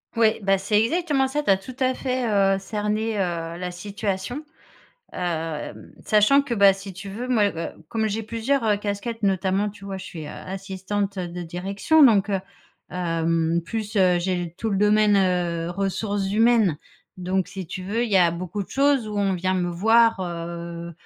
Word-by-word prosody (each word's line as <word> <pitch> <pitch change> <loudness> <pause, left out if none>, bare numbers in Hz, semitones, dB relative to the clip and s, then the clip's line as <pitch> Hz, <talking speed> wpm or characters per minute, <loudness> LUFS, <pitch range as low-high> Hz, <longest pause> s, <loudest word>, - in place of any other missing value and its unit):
Ouais 225 -1 +3
beh, 195 -1 +3
c'est 210 +2 +2
exactement 290 0 +1
ça, 295 +3 -2
tu 200 - +3
as 190 - +4
tout 220 +7 -10
à 260 0 +2
fait, 255 -2 -2
heu, 195 -2 +3
cerné, 210 +2 -2
heu, - - +3
la 170 0 -3
situation. 200 - -4 0.7
Hem, 160 - -4
sachant 215 +7 +5
que 255 - -6
bah 200 -3 +6
si 195 0 -9
tu 185 +2 -9
veux, 220 +6 -5
moi, 240 -5 +3
heu, 165 - -3 0.2
comme 220 -1 -1
j'ai 220 +2 -2
plusieurs, 230 +4 -1
heu, 210 -2 +3
casquettes 210 +3 -4
notamment 195 +1 +1
tu 200 -1 -13
vois, 195 - -4
je 190 - -8
suis, 160 -3 -8
heu, - - -7
assistante 195 +2 -4
de 175 0 -4
direction 195 - +1
donc 215 -6 +5
heu, 195 -2 0 0.5
hem 165 -1 0
plus, 220 +2 -4
heu, 180 -2 +4
j'ai 175 -1 -2
tout 225 - -2
le 200 - 0
domaine 210 0 +4
heu, 175 -3 0
ressources 195 +1 -2
humaines 220 -6 +4 0.4
donc 185 0 -1
si 190 -2 -7
tu 185 - -5
veux 225 +5 0
il 225 - -4
y 195 - +4
a 175 -2 +5
beaucoup 185 +4 -4
de - - -24
choses 275 -4 +2
où 210 - -5
on 200 -1 +1
vient 185 +1 0
me 180 -1 0
voir 225 +5 +4
heu, 170 -1 -5
195 Hz, 190 wpm, -24 LUFS, 180-220 Hz, 0.7 s, bah